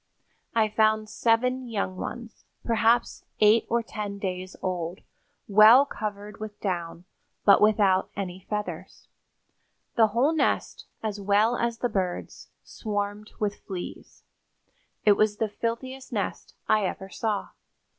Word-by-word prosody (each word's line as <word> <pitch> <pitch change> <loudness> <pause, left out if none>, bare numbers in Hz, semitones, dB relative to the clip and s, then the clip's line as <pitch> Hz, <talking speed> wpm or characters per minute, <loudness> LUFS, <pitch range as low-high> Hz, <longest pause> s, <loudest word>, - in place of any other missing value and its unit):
I 220 -1 +4
found 215 0 +2
seven 250 +2 +1
young 200 -4 -2
ones, 230 +4 -7 0.2
perhaps 230 +1 +2 0.2
eight 215 +2 +5
or 235 0 +1
ten 210 -2 -5
days 185 -1 -4
old, 180 -1 -3 0.5
well 215 +6 +8
covered 210 -5 -6
with 215 -1 -7
down, 175 -3 -3 0.4
but 200 - +7
without 205 -3 +4
any 190 -1 -6
feathers. 210 -1 -5 0.9
The 225 -1 +5
whole 245 +9 +2
nest, 305 -4 -1 0.2
as 210 -2 -3
well 205 +4 +3
as 235 -1 -1
the 245 - 0
birds, 190 -5 -4
swarmed 205 -1 -4
with 205 -1 -1
fleas. 185 -3 -8 0.8
It 205 -1 +6
was 215 -1 +2
the 220 - 0
filthiest 255 +5 -4
nest - - -4
I 215 -3 +3
ever 190 +1 -6
saw. 210 +1 -2
210 Hz, 125 wpm, -26 LUFS, 200-230 Hz, 0.9 s, well